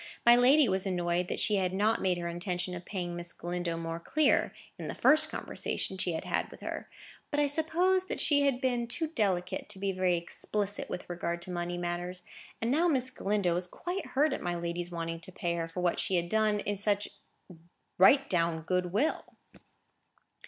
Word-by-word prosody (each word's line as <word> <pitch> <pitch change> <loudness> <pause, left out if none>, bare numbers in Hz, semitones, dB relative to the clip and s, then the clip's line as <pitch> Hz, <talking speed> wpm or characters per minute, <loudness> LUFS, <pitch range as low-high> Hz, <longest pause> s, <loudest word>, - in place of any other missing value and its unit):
My 235 0 +9
lady 260 +4 +6
was 190 0 0
annoyed 175 -1 0
that - - -3
she 210 - +2
had 185 -1 0
not 215 +3 +2
made 185 -2 +1
her 170 0 -3
intention 180 +1 -3
of 175 -1 -7
paying 175 -3 -4
Miss 175 0 -2
Galindo 175 -1 -3
more 165 0 -4
clear, 300 - +2 0.3
in - - -5
the - - -4
first 310 +1 +4
conversation 190 - -4
she 185 -2 -1
had 160 - -3
had - - -1
with - - -13
her; - - -5 0.4
but 290 - -1
I 295 - +4
suppose 335 +6 +2
that - - -4
she 285 -2 +4
had 275 -3 +2
been 245 -3 0
too 320 +6 -2
delicate 195 - -1
to - - -4
be 195 0 -1
very 185 -2 +1
explicit 205 +4 -3
with 180 - -5
regard 175 -1 -3
to 185 - -6
money 175 0 -3
matters; 175 +1 -3 0.4
and 230 +2 0
now 325 +6 +3
Miss 260 -5 +1
Galindo 200 -6 0
was 180 +1 -1
quite 355 - -4
hurt 295 +4 +2
at - - -3
my 175 0 -2
lady's 170 0 -3
wanting 165 -1 -4
to 180 - -9
pay 175 -1 -2
her 165 -1 -2
for 165 +2 -5
what 175 -1 +1
she 190 - +1
had 175 -1 0
done 215 0 +2
in 205 0 -2
such 205 +1 +1 0.9
right 270 +9 +7
down 165 -2 +1
good 180 +2 0
will. 265 - -1
185 Hz, 200 wpm, -30 LUFS, 175-240 Hz, 0.9 s, My